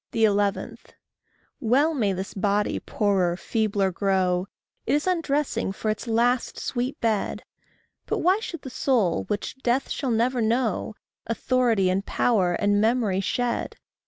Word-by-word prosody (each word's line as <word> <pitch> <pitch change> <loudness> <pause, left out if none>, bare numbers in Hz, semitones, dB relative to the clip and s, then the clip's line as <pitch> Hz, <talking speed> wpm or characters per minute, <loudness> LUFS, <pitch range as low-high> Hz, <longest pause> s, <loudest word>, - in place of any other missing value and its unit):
11. 205 -2 +1 0.8
Well 275 +8 +3
may 220 -9 +1
this 190 +1 -4
body 205 +1 0
poorer, 190 -4 0
feebler 205 0 0
grow! 185 -1 +1 0.4
It - - +3
is 295 - 0
undressing 300 - 0
for 215 +2 -1
its 215 +3 -5
last 240 +2 +1
sweet 250 +2 -3
bed; 220 -3 -1 0.6
But - - 0
why 370 +4 +3
should 335 -8 -7
the 265 - -7
soul, 225 -13 +1
which 210 +5 -4
death 250 +2 0
shall 275 - -2
never 240 +2 +1
know, 225 -2 0 0.3
Authority, 230 -4 +1
and 190 +2 0
power, 195 -6 +1
and 205 +2 +2
memory 220 -4 +2
shed? 240 +4 -1
220 Hz, 135 wpm, -25 LUFS, 200-255 Hz, 0.8 s, Well